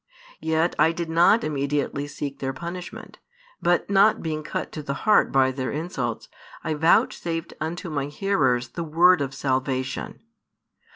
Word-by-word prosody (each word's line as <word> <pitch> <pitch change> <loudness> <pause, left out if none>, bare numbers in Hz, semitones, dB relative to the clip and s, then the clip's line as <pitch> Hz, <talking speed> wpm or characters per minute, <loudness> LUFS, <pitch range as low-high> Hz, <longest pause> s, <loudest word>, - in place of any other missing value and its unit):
Yet 160 +1 +1
I 165 - +4
did 165 -1 -4
not 175 +7 +5
immediately 145 -1 -1
seek 140 -1 -6
their 135 -1 -2
punishment, 175 +5 -8 0.4
but 175 0 +2
not 200 +2 +4
being 155 -2 -2
cut 155 - -4
to 155 - -6
the 140 -1 -4
heart 215 - +4
by 130 -1 +3
their 130 0 -3
insults, 135 -7 -4 0.4
I 160 - -1
vouchsafed 165 +1 +1
unto 175 +4 -4
My 140 -2 -1
hearers 145 -8 0
the 170 - -5
word 170 +2 +4
of 135 -1 -3
salvation. 130 +2 -2
155 Hz, 150 wpm, -24 LUFS, 135-170 Hz, 0.4 s, not